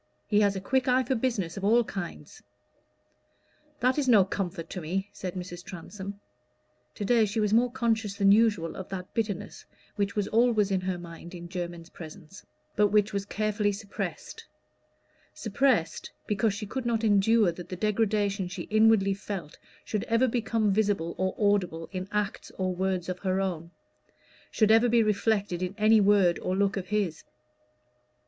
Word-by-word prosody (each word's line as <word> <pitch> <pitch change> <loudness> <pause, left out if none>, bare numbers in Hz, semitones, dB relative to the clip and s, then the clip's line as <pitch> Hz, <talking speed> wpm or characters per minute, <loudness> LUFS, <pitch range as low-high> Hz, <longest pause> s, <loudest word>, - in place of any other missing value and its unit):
He 210 - +2
has 200 -1 +3
a - - -2
quick 260 +6 0
eye 255 +1 +3
for 260 - -1
business 225 -8 -1
of 195 - -6
all 230 +4 +4
kinds." 195 -5 -7 1.4
"That 255 +3 +2
is 280 - -1
no 210 -6 +6
comfort 185 -3 -4
to 185 - -5
me," 190 +5 -3
said 185 -1 -6
Mrs. 180 -1 -7
Transome. 195 +2 -8 0.8
To 205 - -4
day 230 +1 +4
she 210 +2 -2
was 210 -1 +1
more 240 +2 +4
conscious 225 -5 0
than 200 0 +4
usual 205 -7 +3
of 190 - -7
that 185 -1 -6
bitterness 210 -5 -3 0.3
which 200 -1 -1
was 205 -2 0
always 225 -3 +3
in 190 -1 +1
her 185 -1 -2
mind 170 +1 -10
in 175 0 -8
Jermyn's 175 -2 -6
presence, 160 +4 -11 0.3
but 210 0 +4
which 210 +1 +2
was 200 0 -2
carefully 210 -1 0
suppressed: 200 0 -6 0.9
suppressed 220 -5 0 0.2
because 210 0 0
she 210 - -5
could 240 +4 -4
not 230 -1 0
endure 210 -1 +4
that 175 +1 -10
the 185 - -4
degradation 205 -1 0
she 180 - -6
inwardly 215 -2 +4
felt 195 -6 -7 0.3
should 210 -2 -2
ever 230 +3 +2
become 225 -3 0
visible 200 -5 0
or 185 0 0
audible 185 -6 +1
in 185 0 -5
acts 210 -1 -2
or 185 -1 -1
words 185 -1 -1
of 185 -1 -4
her 190 0 0
own 170 -4 -3 0.8
should 215 -1 +3
ever 225 +2 +5
be 235 0 +4
reflected 205 -3 0
in 185 +2 -3
any 215 0 +5
word 195 -4 +4
or 185 - -2
look 200 0 +1
of 190 -1 -4
his. 200 -6 -1
200 Hz, 170 wpm, -28 LUFS, 185-220 Hz, 1.4 s, no